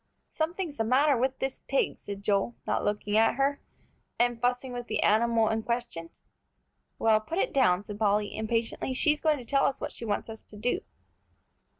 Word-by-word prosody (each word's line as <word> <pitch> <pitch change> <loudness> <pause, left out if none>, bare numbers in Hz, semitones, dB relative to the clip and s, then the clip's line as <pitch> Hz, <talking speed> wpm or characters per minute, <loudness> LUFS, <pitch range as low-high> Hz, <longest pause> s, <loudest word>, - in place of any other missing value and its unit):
"Something's 330 -1 -3
the 225 - +1
matter 270 +5 +3
with 260 +2 0
this 265 0 -3
pig," 275 - 0
said 200 0 -7
Joel, 200 +3 +1
not - - 0
looking 205 0 -1
at 225 +1 +4
her, 275 +2 0 0.6
and 240 -1 +1
fussing 250 +1 0
with 245 -1 -5
the 215 - 0
animal 225 +1 +3
in 220 0 0
question. 235 -8 -3 0.9
"Well, 220 -1 +4
put 325 +10 -5
it - - 0
down," 205 -8 +3
said 210 0 -7
Polly, 210 -1 +1
impatiently. 230 +3 -2
"She's 300 +2 +2
going 310 -2 +3
to 250 - -9
tell 275 +3 +2
us 275 - -2
what - - -4
she - - -9
wants 205 -3 -2
us 225 -1 -8
to 210 - -15
do." 245 - 0
235 Hz, 190 wpm, -28 LUFS, 215-270 Hz, 0.9 s, at